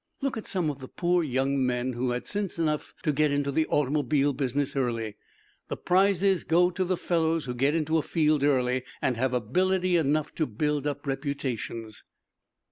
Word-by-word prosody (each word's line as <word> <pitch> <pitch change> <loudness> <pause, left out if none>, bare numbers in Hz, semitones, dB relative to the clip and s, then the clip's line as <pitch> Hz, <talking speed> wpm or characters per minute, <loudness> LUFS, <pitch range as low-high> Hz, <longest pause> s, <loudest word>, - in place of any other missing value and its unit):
Look 275 -1 -1
at 220 - -6
some 175 -5 +1
of 140 - -10
the 130 - -8
poor 175 +2 +1
young 135 -1 0
men 125 0 0
who 125 +1 -1
had 120 0 -2
sense 205 -3 -2
enough 155 -2 -1
to 155 - +2
get 150 +1 +2
into 145 0 0
the 155 +2 +1
automobile 145 0 +1
business 140 +1 -1
early. 115 -5 -1 0.5
The - - -4
prizes 190 0 +2
go 175 +2 +3
to 185 +1 -1
the 185 0 0
fellows 165 -3 0
who 125 - -3
get 135 +5 +1
into 160 0 +1
a - - 0
field 155 -2 +1
early 130 -3 +2 0.2
and 130 - 0
have 130 +2 0
ability 180 - +1
enough 155 -1 0
to 155 - -1
build 150 +5 -1
up 145 0 -4
reputations." 130 -6 -4
145 Hz, 185 wpm, -27 LUFS, 130-165 Hz, 0.5 s, go